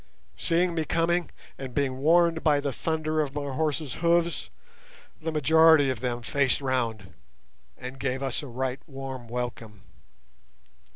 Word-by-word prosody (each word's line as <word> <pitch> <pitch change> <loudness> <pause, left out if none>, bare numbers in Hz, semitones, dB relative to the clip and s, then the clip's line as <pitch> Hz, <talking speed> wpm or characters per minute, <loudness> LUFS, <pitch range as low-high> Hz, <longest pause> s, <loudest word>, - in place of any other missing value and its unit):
Seeing 175 +1 +1
me 160 -1 0
coming, 170 +3 +1 0.3
and 130 -2 -7
being 135 -3 0
warned 165 +2 +3
by 150 -3 +4
the 140 -1 -2
thunder 155 0 -1
of 145 -2 -4
my 145 -2 -3
horses' 150 -2 -1
hoofs, 170 -1 +1 0.7
the 160 +1 -2
majority 160 -1 +5
of 130 - -4
them 120 -1 -3
faced 140 +1 +1
round, 120 -7 -2 0.6
and 130 +2 -8
gave 130 0 -2
us 135 -2 -1
a 145 - -8
right 130 +1 -3
warm 135 -3 -7
welcome. 115 -3 -5
140 Hz, 140 wpm, -27 LUFS, 130-160 Hz, 0.7 s, majority